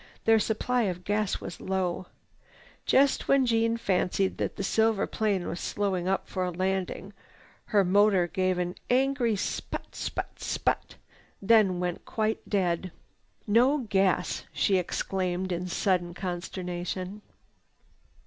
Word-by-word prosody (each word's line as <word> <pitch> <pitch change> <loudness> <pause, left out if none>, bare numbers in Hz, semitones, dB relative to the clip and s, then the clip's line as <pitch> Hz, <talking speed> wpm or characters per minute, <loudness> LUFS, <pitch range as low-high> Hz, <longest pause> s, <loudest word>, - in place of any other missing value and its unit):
Their 225 0 +6
supply 230 +3 0
of 180 0 -5
gas 205 +1 0
was - - -8
low. 185 -1 -2 0.8
Just 275 0 +3
when 275 -1 +4
Jeanne 230 -1 +2
fancied 190 -2 0
that - - -2
the - - -4
silver 220 +1 +2
plane 200 -5 -1
was 170 - -4
slowing 190 -3 -1
up 195 0 0
for 185 - -2
a 180 - 0
landing, 190 +2 -2 0.5
her 200 -2 +3
motor 195 -1 +4
gave 185 0 0
an 180 0 -1 0.2
angry 255 -3 +2
sput 195 - -4
sput - - -4
sput, - - -1 0.4
then 200 -3 +4
went 180 -1 -3
quite 220 0 -1
dead. 185 -3 0 0.5
"No 245 +7 +4
gas!" 190 -3 +1
she 195 - +2
exclaimed 185 +1 -2
in 180 +1 -2
sudden 175 -1 0
consternation. 180 +1 -4
190 Hz, 130 wpm, -28 LUFS, 180-215 Hz, 0.8 s, Their